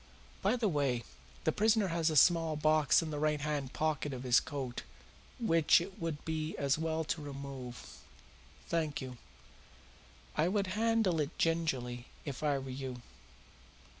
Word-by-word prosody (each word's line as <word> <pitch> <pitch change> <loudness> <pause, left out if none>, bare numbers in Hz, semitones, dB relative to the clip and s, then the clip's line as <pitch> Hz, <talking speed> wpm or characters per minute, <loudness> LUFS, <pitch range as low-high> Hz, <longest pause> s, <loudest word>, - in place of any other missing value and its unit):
By 205 +5 +2
the 235 -3 +1
way, 140 -8 0 0.4
the - - +3
prisoner 215 -2 +3
has 165 -1 +1
a 155 - -1
small 165 +1 +5
box 155 0 +4
in 160 - -4
the 150 - -3
right 150 0 +1
hand 145 -2 -2
pocket 150 -2 -1
of 125 -1 -6
his 125 -1 +5
coat 135 -5 -5 0.6
which 165 -9 +5
it 185 +3 -7
would 165 -3 -3
be 160 0 -3
as 140 -1 +2
well 160 0 -1
to 155 0 -2
remove. 135 -4 -8 0.7
Thank 160 -3 -1
you. 125 -3 -7 1.2
I 155 - +2
would 200 +1 +1
handle 220 -6 +2
it 150 +2 -4
gingerly 130 -7 0 0.2
if 140 -3 -5
I 145 -2 +2
were 135 -1 -6
you. 130 -2 -6
155 Hz, 155 wpm, -33 LUFS, 135-165 Hz, 1.2 s, small